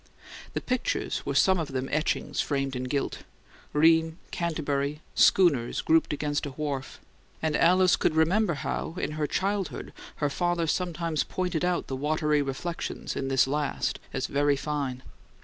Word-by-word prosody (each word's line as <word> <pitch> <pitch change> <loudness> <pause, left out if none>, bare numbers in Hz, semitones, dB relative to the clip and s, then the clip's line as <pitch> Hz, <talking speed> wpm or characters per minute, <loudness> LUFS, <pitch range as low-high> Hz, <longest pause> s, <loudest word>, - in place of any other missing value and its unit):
The - - -2
pictures 255 -1 -1
were - - -1
some 190 -1 +4
of 150 -4 -4
them 130 0 -2
etchings 155 +2 0
framed 135 -2 -1
in 125 0 -3
gilt: 140 +2 -2 0.5
Rheims, 160 +1 +4 0.2
Canterbury, 150 -3 -1
schooners 145 -11 +4
grouped 160 0 +3
against 145 0 -1
a - - -4
wharf; 140 -1 -4 0.4
and 155 -1 0
Alice 185 +3 +5
could 155 - +1
remember 170 +3 +3
how, 150 +4 -3
in - - -2
her 155 -1 -1
childhood, 195 +1 -2 0.2
her 145 - 0
father 175 +1 0
sometimes 170 -1 -1
pointed 180 -3 -2
out 180 0 +1
the 135 - -4
watery 150 +1 +1
reflections 145 +5 -4
in 135 - -2
this 135 -1 +4
last 145 +1 -1
as 135 -1 -2
very 145 +1 +2
fine. 140 -3 -3
150 Hz, 150 wpm, -27 LUFS, 140-170 Hz, 0.5 s, Alice